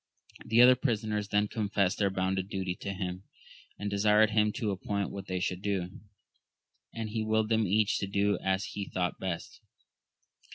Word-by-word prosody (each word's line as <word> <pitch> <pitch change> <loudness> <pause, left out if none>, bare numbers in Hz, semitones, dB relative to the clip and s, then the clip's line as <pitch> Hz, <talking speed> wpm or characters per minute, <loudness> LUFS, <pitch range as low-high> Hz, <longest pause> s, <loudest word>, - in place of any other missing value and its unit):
The 115 +2 +5
other 125 +1 +9
prisoners 110 -5 -1
then 105 0 +1
confessed 100 -3 0
their 100 -2 +3
bounden 95 0 -1
duty 95 -2 -3
to 100 - -5
him, 95 -1 -5 0.5
and 105 - -4
desired 105 +2 +4
him 105 0 +3
to 110 -6 -1
appoint 100 +1 -2
what 100 0 -7
they 95 -1 -2
should 90 +1 -2
do, 95 -3 -3 0.9
and 115 -1 -5
he 110 0 -1
willed 110 0 +1
them 110 -2 +2
each 105 +3 +2
to 100 - -2
do 100 0 +1
as 95 +1 0
he 100 -2 -5
thought 90 -1 -2
best. 95 -3 -5
100 Hz, 170 wpm, -30 LUFS, 95-110 Hz, 0.9 s, other